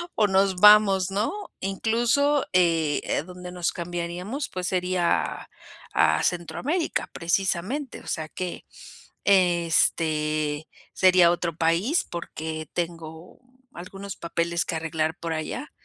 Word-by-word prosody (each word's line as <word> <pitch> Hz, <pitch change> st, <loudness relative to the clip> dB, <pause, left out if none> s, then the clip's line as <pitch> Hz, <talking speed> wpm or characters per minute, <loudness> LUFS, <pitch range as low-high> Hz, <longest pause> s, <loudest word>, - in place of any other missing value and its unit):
o 210 Hz, -, +3 dB
nos 190 Hz, -1 st, +2 dB
vamos, 200 Hz, -2 st, +6 dB
¿no? 205 Hz, +3 st, 0 dB, 0.3 s
Incluso, 235 Hz, +9 st, +1 dB
eh, 165 Hz, -5 st, +1 dB
donde 180 Hz, 0 st, -9 dB
nos 175 Hz, -1 st, -1 dB
cambiaríamos, 175 Hz, -, -4 dB
pues 185 Hz, -1 st, -4 dB
sería 180 Hz, -1 st, +1 dB
a -, -, -7 dB, 0.5 s
a -, -, +3 dB
Centroamérica, 265 Hz, -, -1 dB
precisamente, 190 Hz, -, -2 dB
o -, -, -16 dB
sea, 155 Hz, -1 st, -3 dB
que, 180 Hz, +3 st, -6 dB, 0.6 s
este, 160 Hz, -4 st, +2 dB, 0.3 s
sería 185 Hz, -2 st, +5 dB
otro 170 Hz, -1 st, -1 dB
país 175 Hz, -, +1 dB
porque 160 Hz, -2 st, -6 dB
tengo 165 Hz, -1 st, -6 dB, 0.4 s
algunos 195 Hz, +2 st, -8 dB
papeles 170 Hz, 0 st, -2 dB
que -, -, -3 dB
arreglar 160 Hz, 0 st, -2 dB
por 165 Hz, -1 st, -3 dB
allá. 160 Hz, -, -5 dB
175 Hz, 115 wpm, -25 LUFS, 165-195 Hz, 0.6 s, vamos